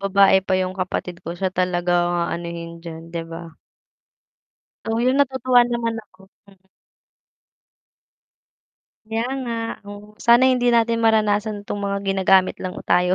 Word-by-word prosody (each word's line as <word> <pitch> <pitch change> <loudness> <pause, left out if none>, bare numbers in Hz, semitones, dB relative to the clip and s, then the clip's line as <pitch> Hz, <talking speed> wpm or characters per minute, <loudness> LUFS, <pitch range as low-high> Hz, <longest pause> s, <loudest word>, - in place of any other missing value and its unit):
babae 195 0 +4
pa 190 - -2
'yong 185 0 -2
kapatid 180 -1 -3
ko, 170 - -4
siya 190 +1 -2
talaga 180 -1 0 0.2
ang 175 - -1 0.2
aanuhin 170 0 -5
diyan, 165 -1 -8
'di 170 - -3
ba? 165 +1 -7 1.4
Oh, 225 +1 -1
'yon, 255 +3 +2
natutuwa 260 -2 +3
naman 235 -1 -2
ako, 190 -2 -29 0.3
hmm. 190 -1 -23 2.4
Kaya 225 +1 -2 0.2
nga, 235 -2 -4 0.3
oh, 205 +1 -11
sana 235 +2 +6
hindi 250 -1 +1
natin 230 0 +2
maranasan 215 -1 +1
'tong 205 - -4
mga 200 0 -1
ginagamit 190 -1 +3
lang 185 -1 -5
tayo 180 +1 +3
200 Hz, 135 wpm, -21 LUFS, 180-225 Hz, 2.4 s, sana